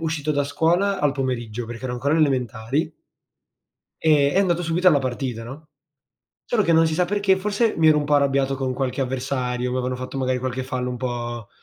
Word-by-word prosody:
uscito 155 -2 -1
da 145 -1 +1
scuola 175 +7 +1
al 145 -3 +2
pomeriggio, 120 -4 -3
perché 120 +2 -8
ero 125 - -2
ancora 140 +5 0
alle 160 - +4
elementari 130 +4 -2 1.1
ehm, 145 -2 +3
e - - +3
andato 175 -3 +2
subito 175 +3 +3
alla 150 -4 +4
partita, 125 -2 -3
no, 145 +6 -10 0.8
solo 230 -4 +1
che 170 - +2
non 165 0 +5
si 160 - -1
sa 180 - +2
perché, 200 0 +2
forse 210 +3 0
mi 160 -1 +4
ero 150 -1 +5
un 145 - -1
po' 145 0 +1
arrabbiato 135 -1 +2
con 130 -1 -2
qualche 130 0 -2
avversario, 125 -1 -2
m'avevano 125 0 -2
fatto 130 +2 -6
magari 130 -1 0
qualche 130 0 -3
fallo 125 -1 -3
un 125 - -4
po' 120 -3 -4
135 Hz, 200 wpm, -23 LUFS, 125-160 Hz, 1.1 s, non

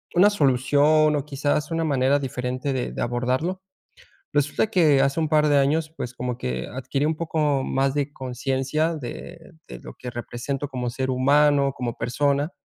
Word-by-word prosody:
una 200 +4 +6
solución 150 0 +3
o 145 0 -2
quizás 145 +2 -1
una 165 0 0
manera 140 -2 +2
diferente 130 +1 -3
de 130 - -2
de - - -5
abordarlo. 130 +10 -1 0.7
Resulta 145 +8 +1
que 160 -9 +4
hace 140 +3 +1
un 155 -2 0
par 150 -1 +3
de 145 - +4
años, 155 +3 +1
pues, 120 0 -5
como 125 -1 -4
que 65 - -4
adquirí 135 +3 -2
un 160 - 0
poco 150 -4 0
más 135 0 0
de 145 0 -1
consciencia 135 +5 -1
de 160 +5 -9 0.2
de - - -9
lo - - -10
que 125 - -7
represento 125 +4 -4
como 125 -3 -3
ser 130 +2 -3
humano, 140 +1 +3
como 120 -2 -3
persona. 140 +5 0
140 Hz, 170 wpm, -24 LUFS, 130-150 Hz, 0.7 s, una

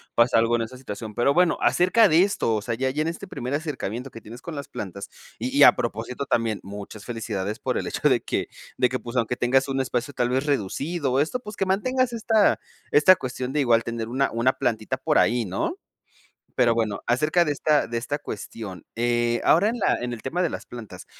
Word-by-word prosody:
pasa 120 0 +4
algo 115 +1 +2
en 115 - 0
esa 125 +3 -8
situación, 110 -3 -7
pero 120 +5 +2
bueno, 180 -1 +3
acerca 210 +5 +4
de 165 +1 +5
esto, 190 - 0
o 105 - -1
sea, 115 +2 -3
ya 130 +3 0
ya 150 +3 -1
en 160 - 0
este 175 +3 -7
primer 125 -5 -5
acercamiento 135 -5 -3
que 115 - -11
tienes 120 +4 -11
con 165 -3 -7
las 140 - -6
plantas 100 0 -7 0.3
y 130 +4 -3
y 145 - +8
a - - +8
propósito 115 +4 -3
también 115 -4 0
muchas 100 +1 -9
felicidades 110 -4 -4
por - - -1
el - - -2
hecho - - 0
de - - +2
que - - -2 0.3
de 125 - +3
que 130 - -1
pues 120 +1 -6
aunque 120 0 +1
tengas 130 +3 +2
un 135 0 0
espacio 125 +2 -2
tal 120 -2 0
vez 130 +3 0
reducido 140 - -1
o 130 - +2
esto 160 - 0
pues 210 -3 -9
que 195 - +1
mantengas 255 +6 +1
esta 225 -2 +3 0.3
esta 185 +6 +7
cuestión 130 -5 -5
de 150 - +1
igual 115 -4 +3
tener 115 -1 -4
una 130 +4 0
una 120 +3 +2
plantita 125 0 -1
por 150 +4 +1
ahí, 120 -1 +3
¿no? 335 +2 -2 0.8
Pero 120 -2 +4
bueno, 110 -3 -1
acerca 150 +8 +2
de 150 - -1
esta 150 +1 +2
de 120 - -3
esta 125 +5 -2
cuestión, 105 - -8
eh 120 0 +1
ahora 190 +6 +5
en 235 +2 -1
la - - +2
en 120 0 -3
el 115 - -7
tema 170 +7 -2
de 175 - +1
las - - -6
plantas, 120 -4 -10
125 Hz, 225 wpm, -24 LUFS, 115-150 Hz, 0.8 s, y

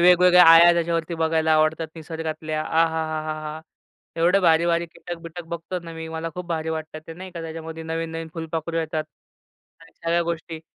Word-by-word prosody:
वेगवेगळ्या 180 0 +7
आळ्या 165 +1 +9
त्याच्यावरती 170 0 -1
बघायला 160 -1 +1
आवडतात. 155 +1 +2
निसर्गातल्या 160 -1 -4
आहाहाहाहा! 155 -1 -1 0.6
एवढं 175 +4 +3
भारी-भारी 170 0 +3
कीटक 175 +1 -8
बिटक 170 +1 -8
बघतो 170 +2 -4
ना 165 - -8
मी, 160 0 -7
मला 160 +1 -4
खूप 180 -1 -6
भारी 160 -2 -2
वाटतात 155 -1 -5
ते 165 - -7
नाही 185 +2 -9
का? 170 - -7
त्याच्यामध्ये 160 0 -7
नवीन-नवीन 165 0 -4
फुलपाखरू 165 0 -4
येतात 160 -1 -2 0.8
आणि 165 - -18
सगळ्या 170 +1 +2
गोष्टी. 165 -1 -4
165 Hz, 155 wpm, -23 LUFS, 160-170 Hz, 0.8 s, आळ्या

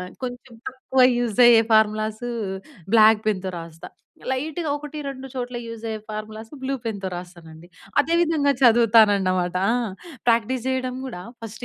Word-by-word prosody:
ఆహ్, 180 0 -7
కొంచుం 245 -1 -8
తక్కువ 260 0 0 0.2
యూజయ్యే 240 0 +5
ఫార్ములాసూ 215 +2 +1 0.6
బ్లాక్ 220 -1 +6
పెన్‌తో 190 -2 -1
రాస్తా. 165 -1 -10 0.4
లైటుగా 305 +5 -3
ఒకటి, 295 +1 -7
రెండు 270 -1 -6
చోట్ల 250 -1 -5
యూజయ్యే 225 -1 -5
ఫార్ములాసు 215 +2 -7
బ్లూ 265 +1 -2
పెన్‌తో 200 -4 -3
రాస్తానండి. 170 -2 -11 0.3
అదే 325 +3 0
విధంగా 310 -4 +2
చదువుతానన్నమాట. 205 -7 +4
ఆ! - - +2 0.5
ప్రాక్టీస్ 235 +1 +1
జెయడం 260 -1 -1
గూడా, 235 -9 -7 0.2
ఫస్ట్ 225 +1 -8
230 Hz, 130 wpm, -23 LUFS, 210-260 Hz, 0.6 s, బ్లాక్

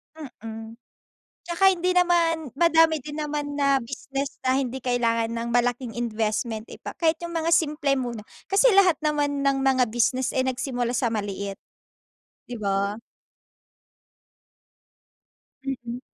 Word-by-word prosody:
Mm. 225 -5 -9 0.7
Tsaka 385 +3 +4
hindi 365 0 0
naman 335 -4 +2
madami 325 -2 +5
din 295 +3 -7
naman 295 -1 -3
na 275 -1 +3
business 275 +3 -5
na 260 +1 +2
hindi 265 -1 -2
kailangan 230 -2 +1
ng 230 0 -3
malaking 245 0 0
investment, 220 -1 -2
'di - - -11
ba? - - -5
Kahit 325 -1 +2
yung 340 0 -5
mga 330 0 0
simple 295 -3 +1
muna. 240 -5 -4 0.3
Kasi 405 +6 +5
lahat 370 -6 +5
naman 290 -2 0
ng 275 -1 +3
mga 260 -2 +4
business, 245 +3 +1
eh, 260 - +2
nagsimula 245 -1 -2
sa 245 - +1
maliit. 200 -2 -4 0.9
Di 245 - -8
ba? 200 0 -1 2.7
Mm. 245 -3 -5
265 Hz, 130 wpm, -25 LUFS, 235-310 Hz, 2.7 s, madami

